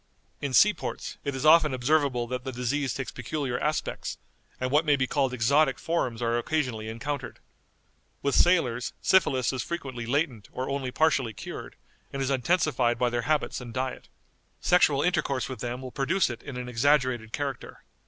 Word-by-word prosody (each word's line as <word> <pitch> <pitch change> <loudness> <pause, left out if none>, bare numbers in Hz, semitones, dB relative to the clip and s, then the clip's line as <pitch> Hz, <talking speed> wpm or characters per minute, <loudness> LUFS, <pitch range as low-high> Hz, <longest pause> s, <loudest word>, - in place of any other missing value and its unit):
_" - - -42 0.4
"In 140 - -2
sea 210 +11 +6
ports - - -6
it 140 -2 -3
is 130 +2 -3
often 155 -3 +6
observable 130 -2 +1
that 125 +1 -4
the 130 - -4
disease 130 +2 -1
takes 130 - -4
peculiar 125 +1 -3
aspects, 150 0 -2 0.4
and 130 0 -2
what 150 +3 +4
may 150 -2 +3
be 130 -2 +1
called 135 -1 0
exotic 135 +2 +3
forms 125 -7 -2
are 115 0 +1
occasionally 120 -6 -2
encountered. 135 +6 -4 0.9
With 140 - +1
sailors, 125 -10 +3
syphilis 140 -9 +3
is 130 - -2
frequently 130 -7 -5
latent 130 -5 -1
or 130 - -4
only 135 -2 -2
partially 130 -5 +1
cured, - - -8 0.4
and 135 - -5
is 135 0 0
intensified 135 -4 +2
by 120 0 +1
their 120 +4 -2
habits 150 -4 0
and 120 -1 -9
diet. 130 0 -3 0.5
Sexual 145 -5 +4
intercourse 140 -7 0
with 130 -4 -7
them 125 +2 -4
will 130 - -7
produce 145 +4 +1
it 120 - -8
in 140 -3 -7
an 125 0 -5
exaggerated 125 -2 +1
character. 140 +1 -5
130 Hz, 175 wpm, -27 LUFS, 125-150 Hz, 0.9 s, sea